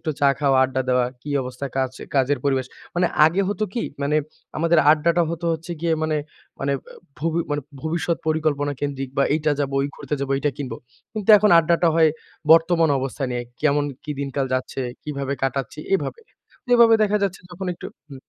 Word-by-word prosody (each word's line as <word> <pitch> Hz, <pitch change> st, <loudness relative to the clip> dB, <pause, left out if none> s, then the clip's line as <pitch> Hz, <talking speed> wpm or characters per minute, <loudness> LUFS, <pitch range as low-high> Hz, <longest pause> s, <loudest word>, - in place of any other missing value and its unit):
একটু 155 Hz, -2 st, -2 dB
চা 140 Hz, -, +5 dB
খাওয়া, 140 Hz, -2 st, +3 dB
আড্ডা 130 Hz, 0 st, -1 dB
দেওয়া। 125 Hz, -1 st, +3 dB, 0.2 s
কি 150 Hz, -, -6 dB
অবস্থা 125 Hz, +2 st, -5 dB
কাজ 130 Hz, -1 st, +1 dB, 0.2 s
কাজের 135 Hz, +1 st, +2 dB
পরিবেশ। 135 Hz, -2 st, +1 dB, 0.3 s
মানে 175 Hz, 0 st, +2 dB, 0.2 s
আগে 165 Hz, +5 st, +3 dB
হতো 215 Hz, +1 st, -1 dB
কি? 235 Hz, -, -1 dB, 0.2 s
মানে 145 Hz, +2 st, +1 dB, 0.4 s
আমাদের 165 Hz, +1 st, +3 dB
আড্ডাটা 170 Hz, +3 st, +3 dB
হতো 170 Hz, +1 st, -4 dB
হচ্ছে 165 Hz, +2 st, -5 dB
গিয়ে 170 Hz, -1 st, +1 dB
মানে, 155 Hz, -1 st, 0 dB, 0.4 s
মানে 140 Hz, 0 st, 0 dB
ব -, -, -15 dB, 0.3 s
ভবি 165 Hz, +2 st, 0 dB
মানে 145 Hz, -1 st, -1 dB, 0.2 s
ভবিষ্যৎ 160 Hz, +1 st, -1 dB
পরিকল্পনা 150 Hz, -2 st, 0 dB
কেন্দ্রিক 135 Hz, -2 st, -3 dB
বা -, -, +5 dB
এইটা 155 Hz, -1 st, +1 dB
যাব 140 Hz, -1 st, -1 dB
ঐ -, -, +3 dB
ঘুরতে -, -, -4 dB
যাবো 140 Hz, 0 st, -1 dB
এইটা 145 Hz, +1 st, 0 dB
কিনব। 140 Hz, -3 st, -5 dB, 0.4 s
কিন্তু 215 Hz, 0 st, 0 dB
এখন 210 Hz, +1 st, +3 dB
আড্ডাটা 170 Hz, +1 st, +3 dB
হয় 165 Hz, -1 st, +5 dB, 0.4 s
বর্তমান 165 Hz, -1 st, +4 dB
অবস্থা 135 Hz, +1 st, -3 dB
নিয়ে 120 Hz, 0 st, -2 dB, 0.2 s
কেমন 145 Hz, -1 st, +3 dB, 0.2 s
কি 150 Hz, -, -6 dB
দিনকাল 140 Hz, 0 st, -2 dB
যাচ্ছে, 130 Hz, +1 st, -3 dB, 0.2 s
কিভাবে 140 Hz, -2 st, -3 dB
কাটাচ্ছি 135 Hz, +1 st, -2 dB, 0.2 s
এভাবে। 325 Hz, -, -2 dB, 0.5 s
এভাবে 235 Hz, -2 st, +7 dB
দেখা 210 Hz, 0 st, +2 dB
যাচ্ছে 195 Hz, -1 st, -1 dB
যখন 185 Hz, +2 st, -6 dB
একটু 170 Hz, -, -8 dB, 0.2 s
হু। 140 Hz, -, -10 dB
150 Hz, 185 wpm, -22 LUFS, 140-170 Hz, 0.5 s, এভাবে